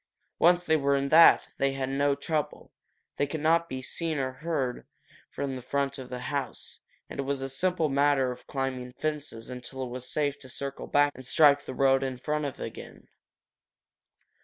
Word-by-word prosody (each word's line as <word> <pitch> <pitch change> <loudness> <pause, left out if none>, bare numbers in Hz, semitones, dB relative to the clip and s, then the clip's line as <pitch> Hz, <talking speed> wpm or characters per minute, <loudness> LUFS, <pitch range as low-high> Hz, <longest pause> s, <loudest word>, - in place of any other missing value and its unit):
Once 175 +1 +4
they 160 - +3
were 140 -2 +2
in 140 0 0
that, 165 +3 +7
they 135 0 +2
had 135 -1 -2
no 140 +1 +1
trouble. 155 0 -3 0.5
They 145 - +1
could 155 +3 -4
not 165 +2 +2
be 130 0 -4
heard 170 - -3 0.4
or 145 -7 0
seen - - -33 0.4
from 135 -1 -4
the 130 - -6
front 140 +2 -2
of 130 - -8
the 125 - -4
house, 140 +2 -5 0.3
and - - -9
it - - +2
was 135 0 -2
a 135 - -3
simple 170 +4 0
matter 140 -2 +2
of 125 - -11
climbing 130 -2 -3
fences 145 -7 -4
until 125 +1 -6
it 125 - -5
was 125 +1 -6
safe 145 -2 0
to 130 - -12
circle 140 +2 -6
back 145 0 +3
and 130 - -11
strike 140 +2 +4
the 130 - -6
road 135 -1 +4
in 130 -1 -3
front 150 +1 -3
again. - - -9
140 Hz, 185 wpm, -28 LUFS, 130-150 Hz, 0.5 s, that